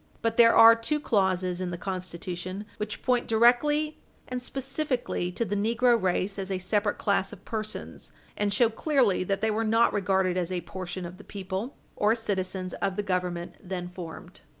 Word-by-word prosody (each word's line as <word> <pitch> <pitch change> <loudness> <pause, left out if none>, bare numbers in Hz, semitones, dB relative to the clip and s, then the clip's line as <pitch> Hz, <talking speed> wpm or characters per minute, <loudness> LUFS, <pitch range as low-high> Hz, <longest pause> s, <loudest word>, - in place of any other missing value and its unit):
But 230 0 +1
there 230 0 +6
are 230 0 +9
two 300 +7 0
clauses 185 -7 +1
in 185 - -2
the 175 - -4
Constitution 185 +1 -5
which 210 0 -5
point 245 -1 +1
directly 295 +7 +3 0.3
and 250 0 -4
specifically 270 - -2
to 230 - -1
the 205 - -2
negro 235 +4 +3
race 190 +2 0
as 190 0 -3
a 190 - -1
separate 205 +3 0
class 200 -1 +1
of 200 -1 -12
persons, 215 -1 -5 0.2
and 205 -1 0
show 225 +3 +3
clearly 245 - +2
that 195 +1 -1
they 220 - +2
were 220 +1 0
not 225 +1 +3
regarded 190 -2 +1
as 180 0 -1
a 180 -1 -1
portion 185 0 -6
of 175 +2 -9
the - - -11
people 195 +6 -5 0.2
or 210 +2 +3
citizens 190 -4 -2
of 195 -1 0
the 205 - -1
Government 180 -3 -2
then 180 -1 -5
formed. 175 -3 -9
200 Hz, 180 wpm, -27 LUFS, 185-230 Hz, 0.3 s, are